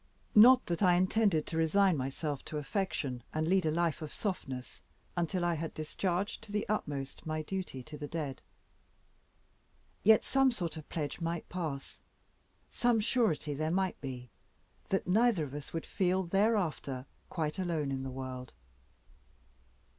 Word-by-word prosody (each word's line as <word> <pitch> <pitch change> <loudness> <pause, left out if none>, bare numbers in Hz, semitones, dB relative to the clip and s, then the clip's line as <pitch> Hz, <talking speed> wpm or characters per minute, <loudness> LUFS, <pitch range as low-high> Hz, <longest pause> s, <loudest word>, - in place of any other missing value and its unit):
Not 250 +4 +8
that 170 +1 -2
I 180 -3 +6
intended 185 -3 +3
to 165 - -4
resign 185 +3 +4
myself 140 +2 -3
to 155 - -4
affection, 145 - -2
and 155 0 +1
lead 185 -2 +3
a - - +3
life 165 0 0
of 155 -2 -5
softness, 135 - -4 0.3
until 175 +1 0
I 175 - +2
had 165 0 -4
discharged 180 +5 -2
to 225 -2 -12
the 210 +2 -1
utmost 145 -10 -3
my 155 0 -1
duty 180 -7 -4
to 150 +2 -9
the 145 - -4
dead. 145 -4 -4 1.6
Yet 220 +1 +6
some 270 -1 +4
sort 175 -8 -3
of 155 -2 -9
pledge 155 +1 -3
might 165 0 -2
pass 155 -7 -4 0.7
some 240 -2 +2
surety 210 - +1
there 155 +2 -1
might 190 +2 0
be, 125 -3 -6 0.6
that 195 - +1
neither 215 -1 +3
of 140 -2 -6
us 145 -1 -7
would 165 - -3
feel 185 0 +1
thereafter 175 - 0 0.2
quite 155 0 -2
alone 165 -6 -1
in 135 -1 -2
the 135 - -4
world. 130 -1 -6
165 Hz, 155 wpm, -32 LUFS, 145-195 Hz, 1.6 s, Not